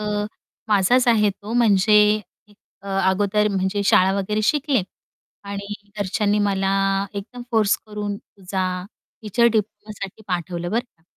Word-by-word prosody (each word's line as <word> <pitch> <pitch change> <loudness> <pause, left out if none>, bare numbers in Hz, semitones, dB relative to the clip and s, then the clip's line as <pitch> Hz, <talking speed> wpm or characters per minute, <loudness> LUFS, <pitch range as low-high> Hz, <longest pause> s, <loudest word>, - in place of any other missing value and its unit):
अ, 210 0 -1 0.4
माझाच 215 +5 +3
आहे 210 -3 +4
तो 205 +3 -9
म्हणजे 210 -2 +4 0.6
अ, 200 - -9 0.2
अगोदर 205 +2 +1
म्हणजे 195 +1 -1
शाळा 190 -1 +4
वगैरे 210 +2 -1
शिकले 280 -1 +2 0.6
आणि 200 +1 -5 0.2
घरच्यांनी 205 +1 +1
मला 195 -2 +1 0.4
एकदम 205 +5 -7
फोर्स 220 -3 +3
करून 210 -1 -4
तुझा 190 -1 -5 0.6
टीचर 230 +3 +2
डिप्लोमासाठी 215 -2 -3
पाठवलं 175 -1 -3
बरं 230 - +1
का? 235 -10 -24
205 Hz, 125 wpm, -22 LUFS, 195-215 Hz, 0.6 s, आहे